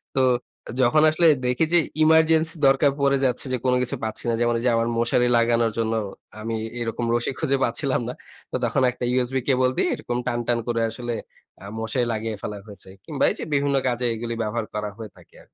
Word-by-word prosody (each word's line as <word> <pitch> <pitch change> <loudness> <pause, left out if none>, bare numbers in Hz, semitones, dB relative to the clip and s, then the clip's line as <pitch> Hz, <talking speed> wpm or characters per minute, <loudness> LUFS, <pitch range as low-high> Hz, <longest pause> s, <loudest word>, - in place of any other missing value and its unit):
তো 135 - +3 0.6
যখন 140 +5 +4
আসলে 165 +2 +4 0.2
দেখি 125 +6 +2
যে, 175 - +8 0.2
ইমার্জেন্সি 160 +1 +4
দরকার 135 +1 +4
পড়ে 140 0 +3
যাচ্ছে 125 +1 0
যে - - +1
কোনো 125 - +3
কিছু 125 - -2
পাচ্ছি 110 -1 -4
না। - - +1
যেমন 120 0 +2
ওইযে, 125 - +1
আমার 115 0 +1
মশারি 120 +1 +2
লাগানোর 115 -1 +2
জন্য 115 0 0 0.5
আমি 115 +1 -3 0.3
এরকম 115 +1 -2
রশি 120 +2 0
খুঁজে 140 -4 +1
পাচ্ছিলাম 130 +2 0
না। - - -4 0.4
তো - - -3
তখন - - 0
একটা 125 - -8
USB 130 +1 0
কেবল 130 -1 +3
দিয়ে - - +2
এরকম 120 0 -4
টান, 120 -1 0
টান 120 -1 +2
করে 115 -1 0
আসলে 120 0 -4 0.5
আ - - -9
মশারি 115 +3 -1
লাগিয়ে 110 0 -3
ফেলা 105 -1 -4
হয়েছে। 100 -2 -11 0.2
কিংবা 150 -4 -2
এইযে - - -6
বিভিন্ন 140 0 +1
কাজে 125 0 -1
এগুলি 115 +1 -4
ব্যবহার 110 +1 -2
করা 105 0 -3
হয়ে 110 -3 -8
থাকে - - -20
আর - - -17
120 Hz, 200 wpm, -23 LUFS, 115-135 Hz, 0.6 s, যে